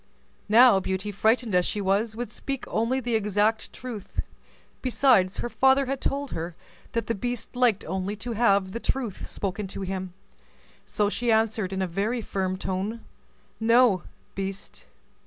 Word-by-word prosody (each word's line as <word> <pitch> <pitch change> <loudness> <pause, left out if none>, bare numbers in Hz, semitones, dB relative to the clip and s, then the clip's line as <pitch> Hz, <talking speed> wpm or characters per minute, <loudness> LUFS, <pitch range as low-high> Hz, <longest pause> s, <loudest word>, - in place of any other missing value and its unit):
Now 230 -2 +7
Beauty, 190 +2 -3
frightened 220 +2 +1
as 180 0 +4
she 210 - -1
was, 205 +3 +1
would 240 +1 -5
speak 275 -2 -4
only 235 +4 0
the 240 -2 -2
exact 210 0 +1
truth; 235 -6 -7 0.6
besides 245 -7 +3
her - - -2
father 265 +2 +4
had 270 +1 -3
told 280 0 -2
her 165 +1 -4 0.4
that 230 -2 0
the 230 - -1
beast 245 +3 -4
liked 245 -5 +2
only 190 +4 -2
to 225 +4 -6
have 200 -4 +2
the 230 - -4
truth 235 -6 -3
spoken 200 +1 -3
to 195 - -6
him. 185 -1 -4 0.7
So 210 - +1
she 235 +3 0
answered, 220 -3 +1
in 190 0 -1
a - - -1
very 205 +8 -1
firm 190 -3 -2
tone, 195 +5 -3 0.6
"No, 230 -4 +5 0.3
beast." 195 0 -6
215 Hz, 155 wpm, -26 LUFS, 190-240 Hz, 0.7 s, Now